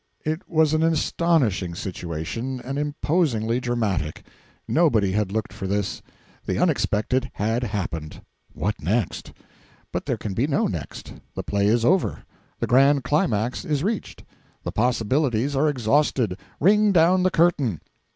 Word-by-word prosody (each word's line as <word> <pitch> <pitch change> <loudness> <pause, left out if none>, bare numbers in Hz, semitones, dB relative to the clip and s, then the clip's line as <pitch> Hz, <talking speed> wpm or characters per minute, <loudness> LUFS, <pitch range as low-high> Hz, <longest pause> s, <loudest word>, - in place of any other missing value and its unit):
It 155 +3 -3
was 160 -2 +3
an 155 - +2
astonishing 155 - +1
situation, 90 +9 -4
and 135 +3 -4
imposingly 145 -6 0
dramatic. 105 -11 -2 0.4
Nobody 115 - +3
had 100 -1 0
looked 110 +3 -3
for 95 - -5
this. 100 0 -2 0.4
The - - -2
unexpected 130 +5 +1
had 110 +4 0
happened. 85 -7 -4 0.3
What 105 -4 -3
next? 100 +6 -1 0.6
But - - -4
there - - 0
can 105 - -5
be 120 +8 +1
no 140 - +1
next; 85 -7 -5 0.2
the - - -4
play 100 0 0
is 115 +2 +2
over; 185 +5 +1 0.3
the - - -1
grand 135 +2 +4
climax 125 -4 0
is 150 -5 -1
reached; 215 +2 -3 0.4
the - - -3
possibilities 125 +3 +1
are 150 +3 +3
exhausted; 125 -5 +1 0.2
ring 210 +5 +4
down 180 +1 +4
the 185 - +3
curtain. 155 - +2
125 Hz, 140 wpm, -24 LUFS, 105-150 Hz, 0.6 s, grand